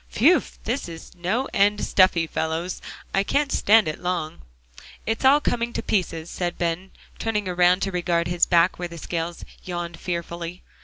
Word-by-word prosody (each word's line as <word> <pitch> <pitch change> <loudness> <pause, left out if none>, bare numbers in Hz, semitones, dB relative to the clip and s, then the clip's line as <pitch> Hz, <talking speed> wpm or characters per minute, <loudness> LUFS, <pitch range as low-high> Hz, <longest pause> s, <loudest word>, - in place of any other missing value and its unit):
"Phew! 315 +9 +5 0.2
this 240 -4 -2
is 165 -1 -10
no 185 +9 -1
end 205 +1 +3
stuffy, 185 -3 +4
fellows. 160 +3 -3 0.3
I 195 - +3
can't 280 +7 0
stand 215 -1 +5
it 155 - -3
long." 175 -3 -3 0.7
"I'm 225 - +2
all 275 +3 +7
coming 235 -4 -1
to - - -3
pieces," 165 -5 -1
said 175 -1 -3
Ben, 175 +2 -2 0.3
turning 210 -3 -1
around 180 +1 +3
to 195 - -1
regard 175 -2 0
his 175 -1 +2
back 175 +1 +3
where 175 - -2
the 170 0 -10
scales 170 +1 -4 0.2
yawned 175 -2 -5
fearfully. 170 0 -5
180 Hz, 165 wpm, -24 LUFS, 170-205 Hz, 0.7 s, all